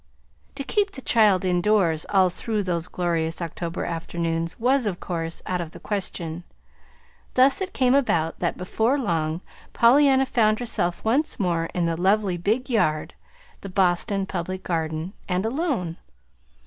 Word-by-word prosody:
To 275 - -4
keep 410 +7 0
the 265 - -8
child 205 -5 +4
indoors 180 -3 +2
all 190 -2 +4
through 215 +3 -2
those 175 -2 -2
glorious 165 -2 -1
October 170 0 -4
afternoons 165 0 -3
was, 255 0 +2
of 180 -3 -3
course, 165 -2 -4
out 180 -1 -1
of 160 -2 -7
the - - -10
question. 175 -5 -4 0.9
Thus 265 +7 +5
it 380 - -2
came 255 -1 +2
about 170 - +1
that, 175 - -1
before 220 +8 0
long, 165 - -1 0.3
Pollyanna 270 +2 +5
found 215 -4 +2
herself 195 -7 -1
once 265 +7 +1
more 170 -4 0
in 175 -1 +1
the 165 0 0
"lovely 195 -1 +2
big 215 +9 0
yard" 155 - 0 0.5
the 195 - -7
Boston 190 +2 +1
Public 185 0 -4
Garden 160 +1 -2 0.2
and 180 +2 0
alone. 235 - -1
185 Hz, 150 wpm, -24 LUFS, 170-230 Hz, 0.9 s, Thus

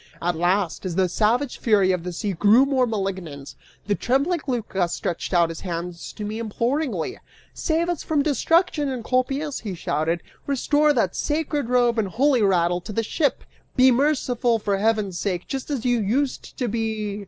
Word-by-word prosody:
At 175 0 -1
last, 175 +1 0
as 180 -3 -3
the 190 0 +3
savage 235 +8 0
fury 200 -5 +3
of 180 -2 -1
the 180 - -4
sea 200 +3 -3
grew 210 +9 +5
more 265 -3 +2
malignant, 190 -10 -4 0.3
the 205 - +1
trembling 280 - +1
Lycas 195 -8 -1
stretched 170 - -3
out 170 -2 +3
his 165 - -6
hands 170 -1 -5
to 210 - -6
me 215 +2 -4
imploringly. 230 - -2 0.3
"Save 330 +1 0
us 350 -3 -2
from 300 -3 0
destruction, 310 0 +2
Encolpius," 260 +4 -1
he 205 -5 -5
shouted; 165 +1 -1 0.2
"restore 290 +2 +2
that 230 -10 +1
sacred 295 -4 -1
robe 240 -2 +3
and 210 - 0
holy 255 +5 +2
rattle 175 -3 +2
to 215 - -8
the 225 +2 -1
ship! 280 +4 0 0.3
Be 260 0 +6
merciful, 250 -3 +1
for 205 -2 -1
heaven's 210 -4 0
sake, 180 -3 -2
just 270 +1 -5
as 270 -5 -3
you 245 -1 +2
used 255 +7 -1
to 250 - -1
be!" 215 -2 -2
225 Hz, 175 wpm, -23 LUFS, 185-270 Hz, 0.3 s, Be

